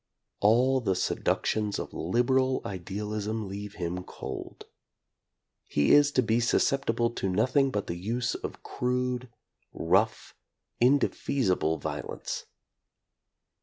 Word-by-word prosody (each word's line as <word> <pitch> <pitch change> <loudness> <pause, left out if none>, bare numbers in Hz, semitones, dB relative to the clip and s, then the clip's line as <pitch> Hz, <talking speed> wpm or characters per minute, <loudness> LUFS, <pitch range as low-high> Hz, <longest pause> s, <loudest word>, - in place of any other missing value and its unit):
All 125 +5 +4
the 95 -5 +1
seduc 90 - 0
tions 105 -2 0
of - - -5
"liberal" 130 +7 +1
idealism 105 +3 -3
leave 100 +1 -7
him 90 +1 -3
cold. - - -8 1.0
He 75 -1 +2
is 145 0 +6
to 130 - +3
be 115 0 +2
susceptible 120 -1 +2
to 95 -4 -2
nothing 130 +8 +3
but 105 -6 -2
the 85 - -4
use 115 +7 -1
of - - -6
crude, 125 0 -1 0.4
rough, 95 +6 +1 0.5
indefeasible 120 - +2
violence. - - -5
110 Hz, 110 wpm, -28 LUFS, 95-125 Hz, 1.0 s, is